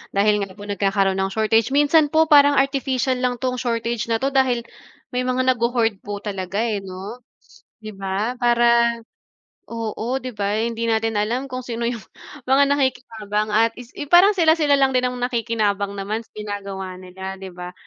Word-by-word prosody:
dahil 210 +1 +3
nga 195 -2 -5
po 205 - -11
nagkakaroon 195 -1 0
ng 195 0 -1
shortage. 225 +1 +2
Minsan 295 +1 +4
po 315 +1 +2
parang 285 -1 +7
artificial 270 -2 0
lang 250 -1 0
'tong 250 0 -3
shortage 235 -2 -2
na 230 +1 -1
'to 275 - +1
dahil 260 -3 +2 0.5
may 250 0 -2
mga 255 0 +2
nagho-hoard 235 -4 0
po 205 0 -7
talaga 195 0 -3
eh, 220 -3 -1
'no, 195 +4 -8 0.6
'di 215 - -7
ba? 200 +6 -2
Parang 235 -1 +3 0.7
oo, 230 +2 -3
'di 255 - -5
ba? 200 0 -1
Hindi 230 0 -2
natin 225 0 0
alam 240 +6 -1
kung 255 0 -4
sino 235 -1 -4
yung 235 -3 -3 0.4
mga 265 +2 +4
nakikinabang. 230 -6 -1
At 225 +1 +3
is 245 -1 -11 0.2
parang 375 +4 +7
sila-sila 315 -3 +4
lang 270 -1 +3
din 255 0 +2
ang 250 - -7
nakikinabang 225 -5 -1
naman 210 +3 -3
sa - - -41
ginagawa 200 -3 -6
nila, 190 +1 -8
'di 190 0 -8
ba? 180 0 -8
230 Hz, 170 wpm, -21 LUFS, 205-255 Hz, 0.7 s, parang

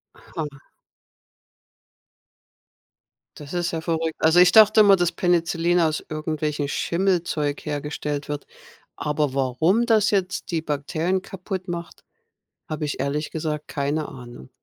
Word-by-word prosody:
Aha. 145 -4 -8 2.7
Das 145 +1 -10
ist 175 0 0
ja 165 - -2
verrückt. 160 -1 -2
Also, 160 +3 +5
ich 180 0 +6
dachte 215 0 +7
immer, 200 -2 +7
dass 175 -1 +1
Penicillin 175 0 +1
aus 155 -2 0
irgendwelchen 155 -2 -2
Schimmelzeug 170 -5 -1
hergestellt 150 -1 -4
wird. 145 -1 -5 0.5
Aber 150 -2 -1
warum 160 - +2
das 220 -2 +3
jetzt 190 -3 -1
die 165 -2 -1
Bakterien 160 +5 -1
kaputt 190 -1 -6
macht, 170 0 -6 0.7
habe 155 0 -3
ich 145 - -4
ehrlich 145 +3 -2
gesagt 155 -2 -3
keine 145 +2 -2
Ahnung. 120 - -11
160 Hz, 125 wpm, -23 LUFS, 150-175 Hz, 2.7 s, dachte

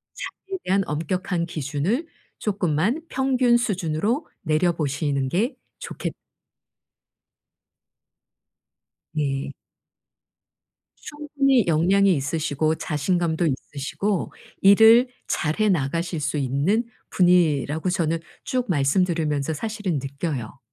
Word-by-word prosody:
자기에 385 0 -6
대한 195 +1 +2
엄격한 170 +3 -2
기준을 165 - -2 0.3
쪼끔만 200 - 0
평균 255 -2 +3
수준으로 205 - -1
내려 160 +2 +2
보시는 145 -3 -1
게 220 - 0 0.2
좋겠 - - -5 3.0
네. 140 -2 -2 1.4
충분히 285 -5 0
역량이 185 +5 +4
있으시고 155 +2 0
자신감도 165 +2 0
있으시고 155 +7 -2 0.3
일을 225 +5 +7 0.2
잘해 175 +8 0
나가실 165 +1 -1
수 150 +1 -2
있는 140 - +1 0.3
분이라고 165 -3 +2
저는 165 -2 0 0.2
쭉 255 -1 -1
말씀 145 +2 +3
들으면서 160 -4 -1
사실은 205 -3 -3
느껴요. 135 -4 -5
170 Hz, 220 characters per minute, -23 LUFS, 150-205 Hz, 3.0 s, 일을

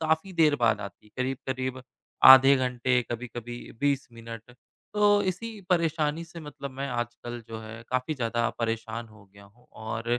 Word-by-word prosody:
काफ़ी 160 +4 0
देर 160 -3 +4
बाद 115 -3 +2
आती 100 +1 -9
है। - - -22
करीब-करीब 130 0 -3 0.4
आधे 135 +1 +10
घंटे, 125 0 +1
कभी-कभी 120 0 -5 0.2
20 140 -1 +1
मिनट। 115 +1 -10 0.4
तो 205 0 +4
इसी 205 +3 -3
परेशानी 165 -2 +1
से 170 0 -11
मतलब 145 -2 -8
मैं 135 +1 -4
आजकल 120 0 -4
जो 115 -1 -6
है 110 +1 -9
काफ़ी 130 +4 0
ज़्यादा 120 -2 0
परेशान 115 0 -3
हो 105 -2 -17
गया 100 0 -15
हूँ। 115 +5 -23
और 110 +2 -2
125 Hz, 160 wpm, -27 LUFS, 115-150 Hz, 0.4 s, आधे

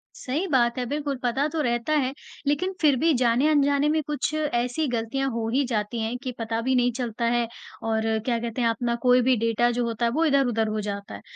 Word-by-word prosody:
सही 295 +9 -2
बात 240 -5 +2
है। 250 - -1
बिल्कुल, 285 +1 -2
पता 265 +5 +1
तो 315 - 0
रहता 240 +3 0
है, 270 -3 +1 0.3
लेकिन 365 +7 0
फिर 290 -3 +5
भी 330 -2 +4
जाने-अनजाने 285 +4 +3
में 310 0 +2
कुछ 300 +1 -2
ऐसी 290 -1 0
गलतियाँ 250 +3 -1
हो 225 -1 -2
ही 275 +1 +3
जाती 225 -1 -2
हैं 230 +3 -2
कि 255 - -3
पता 225 0 -2
भी 260 +2 +1
नहीं 245 0 +3
चलता 235 -2 -3
है 240 -1 +1 0.4
और 220 0 0 0.2
क्या 240 -2 +1
कहते 235 +1 -3
हैं 230 - +3
अपना 235 +1 -1
कोई 250 0 +6
भी 255 +1 +3
डेटा 230 +2 +2
जो 240 0 -1
होता 235 +1 -1
है, 230 - +1
वो 320 +5 +1
इधर-उधर 245 -7 +2
हो 215 0 -2
जाता 200 - -5
है। 100 - -10
245 Hz, 220 wpm, -25 LUFS, 230-280 Hz, 0.4 s, कोई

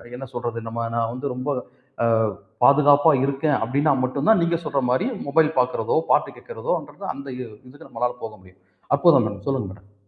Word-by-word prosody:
என்ன 135 +1 -8
சொல்றது, 120 -1 -4
நம்ம 115 +1 -3
நான் 115 0 0
வந்து 135 +3 -4
ரொம்ப, 130 +3 -4 0.5
ஆ, - - +3 0.6
பாதுகாப்பா 145 +2 +6
இருக்கேன் 140 +1 0
அப்பிடின்னா 140 +5 +2
மட்டுந்தான், 145 +10 +2
நீங்க 170 0 0
சொல்றமாரி 130 - 0 0.2
மொபைல் 155 +2 +3
பாக்கிறதோ! 125 +1 0
பாட்டு - - +3
கேட்கிறதோன்றது 485 0 -5
அந்த 140 0 -10
இ - - -5 0.3
இதுக்கு 145 +3 -14
நம்மளால 125 0 -2
போக 110 -1 -6
முடியும். 95 0 -21 0.4
அப்புறம் 140 -8 +5
தான் 100 -1 -8
சொல்லுங்க 130 -8 -1
மேடம். 100 0 -20
135 Hz, 160 wpm, -23 LUFS, 115-145 Hz, 0.6 s, பாதுகாப்பா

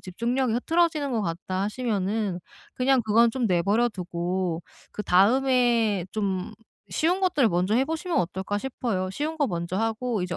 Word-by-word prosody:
집중력이 235 +6 -1
흐트러지는 310 +3 +1
것 230 - 0
같다.' 185 +1 -3
하시면은 210 -3 -1 0.4
그냥 260 0 +2
그건 225 +2 +4
좀 250 -2 0
내버려두고 180 -3 0 0.3
그다음에 225 -1 +3
좀 195 -4 -2 0.4
쉬운 345 +4 +1
것들을 305 -10 +3
먼저 180 +3 +1
해 260 - +3
보시면 325 +3 -2
어떨까 190 +3 -2
싶어요. 205 -6 -3
쉬운 305 +9 -3
거 290 -4 +1
먼저 170 -1 -3
하고 225 -1 -1
이제 180 -1 -3
220 Hz, 330 characters per minute, -25 LUFS, 185-255 Hz, 0.4 s, 그건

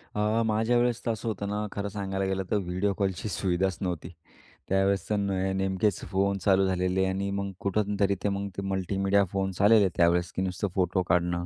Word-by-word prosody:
आह, 105 +2 +1
माझ्यावेळेस 120 +2 +1
तर 115 - +1
असं 110 0 -5
होतं 100 -2 -2
ना 105 +1 -2
खरं 100 0 -3
सांगायला 95 -1 -3
गेलं 95 0 -1
तर 105 - +3
व्हिडिओ 95 +2 -1
कॉलची 95 +1 -1
सुविधाच 95 0 0
नव्हती. 85 -2 -3 0.6
त्यावेळेस 95 -1 +1
तर 105 - +2
ने 95 -1 0
नेमकेच 95 +1 0
फोन 100 +1 +1
चालू 95 -1 +4
झालेले 90 +1 +1
आणि 95 +1 -1
मग 100 0 -2
कुठून 100 +1 0
तरी 100 -1 +3
ते 100 - +2
मग 100 0 -2
ते - - -1
मल्टीमीडिया 95 +1 +1
फोन्स 95 -1 -2
आलेले 105 -1 +6
त्यावेळेस 85 +1 +3
की - - -1
नुसतं 95 +2 -1
फोटो 95 -1 +1
काढणं. 85 0 +1
95 Hz, 190 wpm, -27 LUFS, 95-100 Hz, 0.6 s, आलेले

